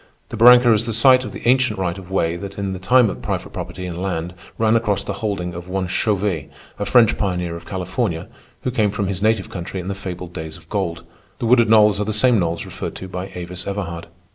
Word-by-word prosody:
The - - -6
barranca 120 +1 +7
is 110 +2 0
the 115 - -1
site 130 +3 +5
of - - -6
the - - -6
ancient 130 -3 +3
right 90 -3 -1
of 95 -2 -11
way 85 -3 0
that 100 +2 -7
in 100 -1 -2
the 95 - -6
time 125 +6 +4
of 95 - -5
private - - -4
property 95 - -6
in 90 0 -5
land 90 -2 -3 0.2
ran 110 0 +3
across 105 -4 +1
the 100 - -4
holding 95 -5 -2
of 85 +1 -8
one 95 0 -1
Chauvet, 95 -5 -1 0.3
a 100 - -1
French 115 +2 +4
pioneer 90 -4 -1
of 85 0 -10
California 90 -1 -2 0.4
who 125 - -1
came 110 -4 +2
from 100 0 -2
his 95 -1 -2
native 110 -2 +1
country 90 +1 -5
in 90 +1 -5
the - - -1
fabled 90 -2 -7
days 80 -2 -6
of 80 -1 -19
gold. 90 -5 -2 0.3
The - - -3
wooded 115 -1 +4
knolls 105 -2 +5
are - - 0
the 110 - -1
same 115 +1 +4
knolls 85 -2 -1
referred - - -6
to 95 - -7
by 90 +1 -6
Avis 90 0 -6
Everhard. 85 -5 -4
95 Hz, 235 wpm, -20 LUFS, 90-110 Hz, 0.4 s, barranca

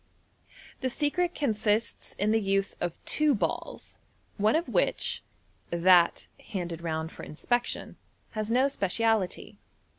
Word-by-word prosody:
The 260 - -1
secret 330 +7 0
consists 220 -4 0
in 205 +2 0
the 225 0 +3
use 195 0 +1
of 175 -1 -1
two 300 -2 +3
balls, 205 - -3 0.4
one 210 +4 +3
of 335 +2 +1
which - - 0 0.5
(that 170 0 +4 0.2
handed 175 -4 -4
round 160 -1 -2
for - - -10
inspection) 240 +10 -2 0.3
has 215 -1 -3
no 255 +4 +4
speciality. 220 -5 0
215 Hz, 120 wpm, -28 LUFS, 180-245 Hz, 0.5 s, that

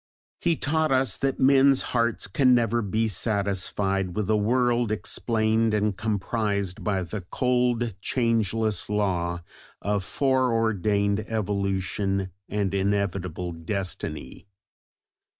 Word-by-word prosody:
He 170 -1 +1
taught 155 +1 0
us 130 -5 +2
that 135 -1 -1
men's 135 0 +5
hearts 115 -2 +1
can 125 +5 +3
never 120 0 +1
be 110 +2 0
satisfied 100 -2 -1
with 105 0 -1
a - - +4
world 120 +1 +1
explained 110 +1 +1
and 105 -1 0
comprised 100 -2 -2
by 100 -3 0
the 95 +4 -5
cold 125 -2 +1
"changeless 110 -4 0
law" 90 -4 -1 0.4
of 100 -1 -1
foreordained 110 -5 +1
evolution 100 -2 -1 0.2
and 100 -2 -1
inevitable 95 -3 -1
destiny. 90 +5 -5
105 Hz, 105 wpm, -25 LUFS, 100-120 Hz, 0.4 s, men's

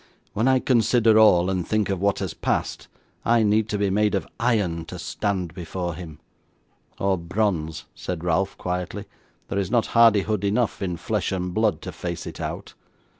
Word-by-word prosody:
'When 110 +4 +1
I 130 0 +5
consider 115 -3 +4
all, 90 -5 +6
and 90 -2 -2
think 110 -2 +1
of 95 -2 -2
what 100 0 +2
has - - -3
passed, - - -2 0.4
I 115 0 +3
need 105 +1 +2
be 100 -1 +1
made 105 +1 +2
of 100 - -1
iron 105 -9 +1
to - - -8
stand 95 -5 -2
before 90 0 -4
him.' 80 -2 -9 0.8
'Or 95 -2 +1
bronze,' 85 -3 -1
said 85 -2 -5
Ralph, 90 +3 0
quietly; 90 +3 -4 0.4
'there 100 - -2
is 95 -2 -1
not 120 -1 +2
hardihood 110 -3 +4
enough 105 +2 0
in 90 -3 -2
flesh 105 +4 -2
and 90 -1 -2
blood 105 -6 +1
to - - -5
face 85 -1 -5
it - - -7
out. - - -5
100 Hz, 175 wpm, -24 LUFS, 90-110 Hz, 0.8 s, all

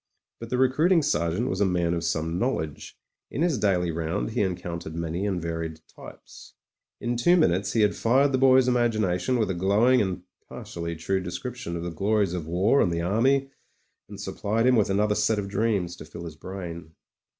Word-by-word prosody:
But 115 - -8
the 125 - -1
recruiting 155 +7 +3
sergeant 105 - 0
was 95 -3 -2
a - - +5
man 85 -2 0
of 85 -1 -2
some 80 +1 -1
knowledge; 80 - -3 0.3
in 150 - -2
his 165 -9 +1
daily 90 -4 +1
round 85 +7 -2
he 120 - 0
encountered 85 -4 -4
many 85 +4 -2
and 95 -3 -1
varied 80 -1 -4
types. - - -14 0.4
In 120 0 -2
two 175 +10 +4
minutes 95 - +2
he 115 - +2
had 105 -1 +3
fired 135 +5 +3
the 130 - +1
boy's 130 -1 +5
imagination 115 -4 +1
with 110 -4 0
a - - -1
glowing 105 +8 +3
and 95 -3 -2 0.3
partially 85 -1 -6
true 95 +4 -1
description 90 +1 -5
of 85 - -4
the 85 - -4
glories 100 +2 0
of 85 -4 -4
war 95 +11 +3
and 90 - +2
the 85 0 -1
army, 135 +8 +2 0.6
and 100 -1 -9
supplied 105 +3 -1
him 130 0 +5
with 110 -4 +2
another 105 +2 +2
set 105 +1 +1
of 100 -1 -3
dreams 100 -4 -1
to - - -10
fill 85 +2 -9
his 80 -2 -8
brain. 85 -2 -8
95 Hz, 195 wpm, -26 LUFS, 85-120 Hz, 0.6 s, a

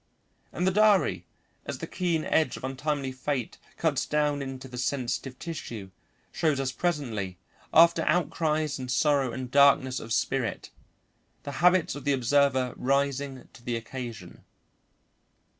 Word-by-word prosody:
And 180 - -2
the 190 - +3
diary, 210 0 +3 0.4
as - - -4
the - - -5
keen 170 -4 -1
edge 160 - +1
of - - -12
untimely 135 +1 -2
fate 130 -1 -3 0.2
cuts - - 0
down 150 -1 +1
into 135 -1 -6
the 125 -1 -7
sensitive 130 0 -2
tissue, 115 - -7 0.4
shows 155 -4 +1
us 135 -1 -1
presently, 120 - -2 0.3
after 165 0 +6
outcries 155 -4 +1
and 130 -1 -6
sorrow 135 -1 +2
and 130 0 -6
darkness 140 -2 +5
of 115 - -9
spirit, 115 -1 -1 0.7
the 140 - -5
habits 180 -1 +4
of 145 - -7
the 145 - +2
observer 130 0 +2
rising 140 0 -1
to 120 - -16
the 120 -1 -2
occasion. 120 -1 -7
140 Hz, 140 wpm, -27 LUFS, 125-150 Hz, 0.7 s, after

